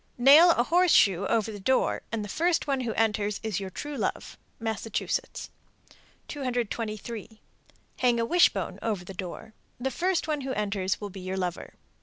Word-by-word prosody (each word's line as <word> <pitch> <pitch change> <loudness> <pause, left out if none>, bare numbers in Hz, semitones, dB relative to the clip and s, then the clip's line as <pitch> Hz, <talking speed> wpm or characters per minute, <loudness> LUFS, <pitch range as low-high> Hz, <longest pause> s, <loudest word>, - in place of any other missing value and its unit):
Nail 285 +8 +8
a 240 - +2
horseshoe 245 - +4
over 225 -1 0
the 205 - -8
door, 260 +7 +1
and 220 -2 -2
the - - -7
first 335 - +1
one 275 -2 0
who 235 -3 -2
enters 210 -2 0
is 215 -4 -2
your 195 -1 -5
true 290 +10 -6
love. - - -3 0.2
Massachusetts. 225 -1 -3 0.8
223. 230 -4 -4 0.6
Hang 245 -2 +3
a 230 - +1
wishbone 350 +8 +2
over 205 -6 -2
the 195 - -8
door. 185 +4 -7 0.3
The 265 +2 -2
first 360 0 0
one 300 -2 -1
who 265 0 -3
enters 200 -3 -1
will 205 -1 -6
be 195 - -9
your 185 +1 -4
lover. 180 -2 -4
225 Hz, 165 wpm, -27 LUFS, 200-265 Hz, 0.8 s, Nail